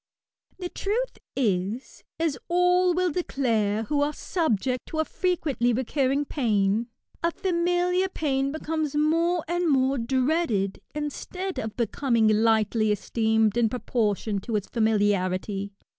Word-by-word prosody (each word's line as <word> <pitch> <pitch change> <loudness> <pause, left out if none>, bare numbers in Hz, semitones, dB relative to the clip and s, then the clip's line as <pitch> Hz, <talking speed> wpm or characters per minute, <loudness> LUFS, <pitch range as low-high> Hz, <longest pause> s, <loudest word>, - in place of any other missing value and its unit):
The 360 -1 -5
truth 465 +8 -2 0.2
is, 210 0 -1 0.2
as 325 -4 +1
all 360 0 +3
will 365 -1 +1
declare 225 - 0
who 285 +6 0
are 295 +1 +1
subject 255 - -1
to 315 - -5
a 315 - +2
frequently 300 -11 0
recurring 270 +3 0
pain, 220 -5 +1 0.3
a 335 - +2
familiar 355 +1 +1
pain 275 -5 -1
becomes 315 -1 -2
more 330 +3 +2
and 350 0 0
more 265 -1 +2
dreaded, 255 - 0
instead 360 +6 -4
of 220 -1 -5
becoming 235 0 +1
lightly 215 0 +3
esteemed 220 0 +1
in 235 -2 +3
proportion 215 -3 -1
to 220 +3 -4
its 205 -2 -1
familiarity. 200 -3 0
265 Hz, 125 wpm, -26 LUFS, 220-330 Hz, 0.3 s, all